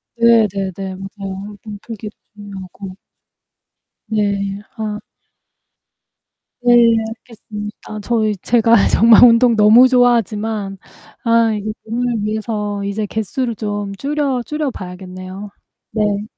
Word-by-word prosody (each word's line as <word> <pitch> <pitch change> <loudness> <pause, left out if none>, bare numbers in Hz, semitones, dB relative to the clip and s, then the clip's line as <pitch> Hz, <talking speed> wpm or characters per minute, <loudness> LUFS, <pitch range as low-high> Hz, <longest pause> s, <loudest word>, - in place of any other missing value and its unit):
네 230 -2 +5
네네. 190 -1 -5
맞아요. 195 +1 -8
몸풀기도 215 0 -8 0.2
중요하고. 195 -2 -9 1.1
네. 200 -2 -1 0.2
아. 210 -1 -3 1.6
네. 240 -1 +5 0.3
알겠습니다. 210 -1 -8
저희 215 -1 0
제가 230 +1 +3
정말 225 +1 +6
운동 235 0 +6
너무 220 +4 +7
좋아하지만 220 -5 +1 0.5
아 230 -1 +3
이제 210 +1 -3
몸을 235 -1 -2
위해서 210 -1 -3
이제 205 +1 -2
개수를 220 +3 -3
좀 205 -2 -4
줄여 275 0 -1
줄여봐야겠네요. 190 -8 -6 0.4
네. 210 -2 0
210 Hz, 225 characters per minute, -18 LUFS, 200-230 Hz, 1.6 s, 너무